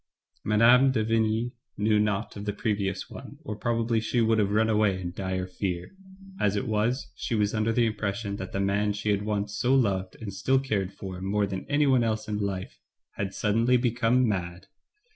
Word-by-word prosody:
Mme. 120 Hz, +5 st, +5 dB
de 130 Hz, -4 st, +1 dB
Vigny 115 Hz, +1 st, +1 dB, 0.3 s
knew 105 Hz, +1 st, +3 dB
naught 105 Hz, -2 st, -1 dB
of 100 Hz, 0 st, -6 dB
the 105 Hz, -, -1 dB
previous 100 Hz, -3 st, -2 dB
one, 140 Hz, +1 st, -10 dB
or 110 Hz, -8 st, -5 dB
probably 115 Hz, +1 st, 0 dB
she 110 Hz, +2 st, -1 dB
would 115 Hz, -1 st, +3 dB
have 100 Hz, -2 st, +2 dB
run 110 Hz, +2 st, +2 dB
away 105 Hz, -3 st, +2 dB
in 90 Hz, -1 st, -4 dB
dire 95 Hz, 0 st, -3 dB
fear. 90 Hz, -1 st, -4 dB, 0.5 s
As 105 Hz, 0 st, +2 dB
it 105 Hz, -, -1 dB
was, 110 Hz, +5 st, 0 dB
she 115 Hz, -, -2 dB
was 105 Hz, -1 st, +1 dB
under 110 Hz, 0 st, +1 dB
the 120 Hz, +1 st, +3 dB
impression 100 Hz, -1 st, -2 dB
that 95 Hz, -2 st, -6 dB
the 95 Hz, -, -2 dB
man 100 Hz, +1 st, +1 dB
she 105 Hz, +1 st, -1 dB
had 100 Hz, -1 st, +1 dB
once 105 Hz, 0 st, -2 dB
so 130 Hz, +2 st, +2 dB
loved 95 Hz, -7 st, +1 dB
and 105 Hz, -4 st, -6 dB
still 130 Hz, +8 st, +2 dB
cared 105 Hz, -8 st, -1 dB
for 95 Hz, -2 st, -8 dB
more 100 Hz, +2 st, +1 dB
than 95 Hz, -1 st, -5 dB
anyone 145 Hz, -4 st, +3 dB
else 110 Hz, -1 st, -1 dB
in 105 Hz, -1 st, -2 dB
life, 95 Hz, -2 st, -4 dB, 0.3 s
had 95 Hz, -1 st, -4 dB
suddenly 115 Hz, +4 st, +2 dB
become 120 Hz, 0 st, +2 dB
mad. 90 Hz, -4 st, -3 dB
105 Hz, 195 wpm, -27 LUFS, 100-115 Hz, 0.5 s, Mme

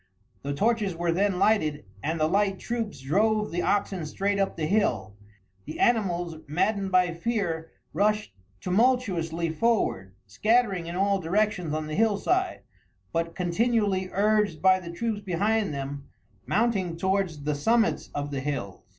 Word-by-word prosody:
The 140 Hz, 0 st, -3 dB
torches 215 Hz, 0 st, +1 dB
were 170 Hz, 0 st, 0 dB
then 195 Hz, +2 st, +1 dB
lighted, 180 Hz, -, +2 dB, 0.2 s
and 160 Hz, +2 st, -2 dB
the 155 Hz, -, +3 dB
light 195 Hz, +3 st, +1 dB
troops 225 Hz, -, -4 dB
drove 210 Hz, +9 st, +1 dB
the 175 Hz, +1 st, -1 dB
oxen 195 Hz, -3 st, 0 dB
straight 200 Hz, +6 st, -1 dB
up 195 Hz, -, 0 dB
the 160 Hz, -, -1 dB
hill. 125 Hz, -, 0 dB, 0.5 s
The -, -, -7 dB
animals, 175 Hz, -8 st, +1 dB
maddened 190 Hz, +5 st, 0 dB
by 180 Hz, -1 st, +3 dB
fear, 170 Hz, -4 st, -2 dB, 0.2 s
rushed 210 Hz, -, +1 dB, 0.3 s
tumultuously 180 Hz, -6 st, +1 dB
forward, 155 Hz, -, 0 dB
scattering 200 Hz, -, +1 dB
in 170 Hz, -, -5 dB
all 195 Hz, +1 st, +2 dB
directions 185 Hz, -1 st, 0 dB
on 155 Hz, 0 st, -2 dB
the 155 Hz, -, -6 dB
hillside, 225 Hz, -, +1 dB, 0.5 s
but, 165 Hz, 0 st, -1 dB
continually 195 Hz, +1 st, +1 dB
urged 210 Hz, -4 st, +2 dB
by 185 Hz, +1 st, +5 dB
the 175 Hz, -2 st, -9 dB
troops 210 Hz, +4 st, -3 dB
behind 205 Hz, +1 st, 0 dB
them, 140 Hz, 0 st, -5 dB, 0.4 s
mounting 195 Hz, -7 st, 0 dB
towards 190 Hz, -5 st, -1 dB
the 150 Hz, +1 st, 0 dB
summits 225 Hz, +11 st, +1 dB
of 145 Hz, 0 st, -3 dB
the 140 Hz, -, -2 dB
hills. 130 Hz, -9 st, -4 dB
190 Hz, 145 wpm, -26 LUFS, 160-210 Hz, 0.5 s, by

